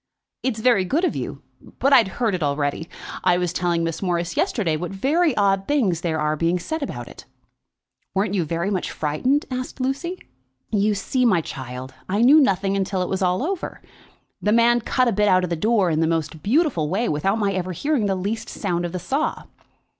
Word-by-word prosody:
"It's 255 -4 -1
very 225 -4 +4
good 300 - +1
of - - -1
you, - - -5 0.3
but 275 +1 +3
I'd 240 -7 +7
heard 230 -4 +1
it 180 - -2
already. 145 +2 -1 0.3
I 180 -1 +4
was 180 -1 -1
telling 170 -2 0
Miss 165 -1 -3
Morris 175 -2 -1
yesterday 170 -9 +1
what 170 +2 -4
very 285 - +1
odd 195 -1 +2
things 210 - +1
there 160 -2 -1
are 150 0 +1
being 165 +3 +1
said 315 - -4
about 280 - -5
it." - - -12 0.9
"Weren't 195 +1 +1
you 190 -4 +1
very 170 +5 -2
much 185 -3 -1
frightened?" 205 - 0
asked 255 +1 -4
Lucy. 280 +8 -2 0.5
"You 210 0 +2
see, 255 +6 -1
my 215 -8 +4
child, 130 -2 -7 0.2
I 205 +4 +2
knew 285 +6 +8
nothing 195 -7 +2
about 195 - +1
it 190 - -1
till 185 -3 0
it - - -4
was 190 +1 -2
all 180 +5 +1
over. 370 +2 -3 0.6
The 210 - +1
man 235 +1 +4
cut 255 +3 +1
the 240 - +2
bit 210 0 +2
out 185 -2 +4
of 180 - -3
the - - +1
door 200 0 +2
in 155 - +1
the 160 - +2
most 160 -1 -2
beautiful 235 - +1
way, 215 +7 0
without 190 +8 0
my 200 -3 0
ever 185 -1 -2
hearing 255 - 0
the 195 - +1
least 200 +5 -3
sound 175 -4 -2
of 175 - -5
the - - -2
saw." 275 - -2
195 Hz, 215 wpm, -22 LUFS, 170-240 Hz, 0.9 s, knew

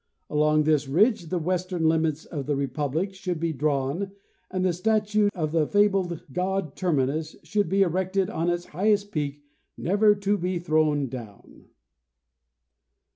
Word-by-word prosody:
Along 150 0 +3
this 150 -2 +2
ridge 195 - +2
the 180 - -1
western 180 0 -1
limits 160 -1 +1
of 140 -5 -6
the 145 - +1
Republic 145 +7 -2
should 180 -3 -4
be 165 0 -1
drawn 150 +6 -1 0.4
and 185 0 -1
the 180 - +2
statue 210 +2 +2
of 155 -4 -2
the 160 -2 +2
fabled 195 -5 +1
god 185 -3 -1
Termi 160 -8 +1
nus 155 +4 -3
should 205 -5 0
be 195 +2 +4
erected 190 +2 0
on 170 -4 -1
its 175 0 -1
highest 205 +4 +1
peak, 145 -3 -3 0.3
never 205 +3 +3
to 200 0 0
be 180 +1 -1
thrown 155 -4 +1
down." 115 -5 -10
170 Hz, 150 wpm, -26 LUFS, 150-195 Hz, 0.4 s, be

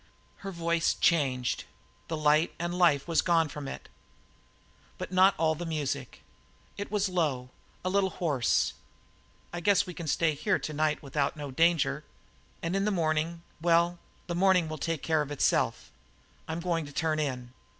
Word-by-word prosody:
Her 195 - -7
voice 170 -1 +1
changed. 130 -7 +1 0.4
The 160 - -3
light 155 +1 +3
and 175 +1 -3
the - - -3
life 160 -6 +3
was 165 -2 +3
gone 165 -3 +2
from 145 -1 -7
it, - - -7 1.1
but - - -6
not 190 +1 +5
all 160 0 +2
the 165 +3 -6
music. 145 -6 -3 0.5
It 205 - -5
was 205 -1 +1
low, 145 -9 -1 0.3
a - - +1
little 195 0 +2
hoarse. 145 -11 +1 0.8
"I 175 - -3
guess 200 +2 +3
we 180 - -7
can 170 -1 -7
stay 160 +2 +2
here 190 +7 +1
tonight 155 0 -1
without 140 +1 -1
no 145 -2 -6
danger. 160 -1 +2 0.6
And 170 +3 -1
in 195 +1 +1
the - - +2
morning 165 -2 0 0.2
well, 170 +1 +3 0.3
the 175 - -4
morning 180 -1 +3
can 155 -1 -5
take 165 -1 -2
care 160 -2 +2
of 145 - -4
itself. 145 - 0 0.6
I'm 160 +1 -3
going 165 -3 -1
to - - -10
turn 155 +1 0
in." 125 -4 -3
165 Hz, 170 wpm, -29 LUFS, 150-175 Hz, 1.1 s, not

